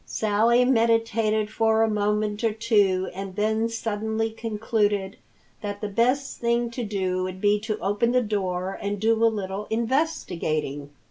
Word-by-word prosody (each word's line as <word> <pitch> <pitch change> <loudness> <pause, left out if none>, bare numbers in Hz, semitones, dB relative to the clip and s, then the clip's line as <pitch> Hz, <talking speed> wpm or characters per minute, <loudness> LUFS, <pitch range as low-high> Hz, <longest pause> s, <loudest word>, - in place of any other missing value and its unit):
Sally 225 +3 +2
meditated 225 -3 +2
for 220 0 +2
a - - +3
moment 210 0 0
or 225 -2 +2
two 205 -5 +2
and 195 0 -6
then 220 +2 +1
suddenly 220 0 -2
concluded 210 -3 -1 0.5
that 205 -1 -4
the 210 - -3
best 250 +6 0
thing 235 0 +1
to 240 +1 -4
do 190 -3 -1
would 185 0 -4
be 205 +1 +3
to 215 0 -3
open 205 +5 0
the 250 0 +3
door 190 -3 -2
and 205 0 -2
do 225 +2 +2
a - - +7
little 205 -1 -4
investigating. 185 - -1
215 Hz, 150 wpm, -25 LUFS, 200-230 Hz, 0.5 s, a